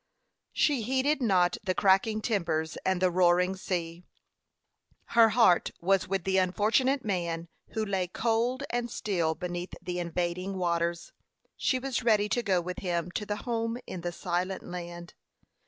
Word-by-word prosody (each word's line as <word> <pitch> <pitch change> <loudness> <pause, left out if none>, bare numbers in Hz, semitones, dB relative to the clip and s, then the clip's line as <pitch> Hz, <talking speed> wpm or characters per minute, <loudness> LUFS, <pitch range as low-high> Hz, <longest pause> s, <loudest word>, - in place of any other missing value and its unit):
She 285 -5 +2
heeded 265 +5 +1
not 180 -6 +3
the 185 -2 -1
cracking 205 +3 +3
timbers 160 -7 -1
and 190 -1 +1
the 185 0 +2
roaring 180 +1 +3
sea. 175 -2 -4 1.1
Her 230 -1 +6
heart 220 -6 +4
was 190 +2 +2
with 190 -1 -1
the 190 +1 +2
unfortunate 225 +9 +2
man 170 -4 -2 0.2
who 220 -1 -1
lay 190 -3 -1
cold 235 +7 0
and 240 0 -1
still 170 -8 -1
beneath 175 +2 -5
the 180 0 -4
invading 175 +2 -2
waters. 170 -1 -1 0.4
She 260 - +1
was 255 -1 -2
ready 215 -3 +3
to 240 - +1
go 190 -6 +1
with 180 +1 -5
him 175 -2 -2
to 210 +3 -4
the 205 - -1
home 230 -1 -1
in 180 - -6
the 175 +1 -3
silent 180 +2 -2
land. 175 -1 -7
185 Hz, 155 wpm, -29 LUFS, 175-225 Hz, 1.1 s, Her